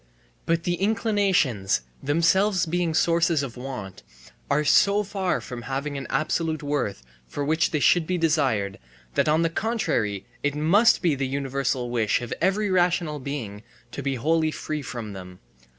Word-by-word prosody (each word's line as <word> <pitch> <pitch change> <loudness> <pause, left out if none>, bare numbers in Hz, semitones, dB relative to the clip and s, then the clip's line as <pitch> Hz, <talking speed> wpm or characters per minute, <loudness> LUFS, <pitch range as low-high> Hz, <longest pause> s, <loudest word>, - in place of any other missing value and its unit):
But 165 0 +1
the 175 0 -2
inclinations, 195 - +1 0.2
themselves 170 +6 +2
being 170 -1 -1
sources 165 -2 +2
of 125 -4 -6
want, 105 -7 -7 0.5
are 150 +2 +2
so 200 +7 +4
far 195 -2 -1
from 125 -2 -7
having 135 +3 -4
an 135 -2 -5
absolute 155 +2 -1
worth 145 - -2 0.2
for 145 - -4
which 160 +2 +2
they 155 - -1
should 165 +2 +3
be 185 - 0
desired 135 - +1 0.3
that - - +2
on 160 +2 +3
the 165 - +2
contrary 165 - -1 0.2
it 145 0 -1
must 190 +11 +4
be 170 -4 +3
the 135 -1 -2
universal 135 -2 -2
wish 115 -3 +1
of 120 - -5
every 195 +2 +1
rational 175 -4 +1
being 125 -7 -5 0.3
to - - -5
be 135 -1 -1
wholly 155 +5 +1
free 155 -1 -4
from 115 -6 -6
them. 90 -1 -10
150 Hz, 160 wpm, -25 LUFS, 125-175 Hz, 0.5 s, so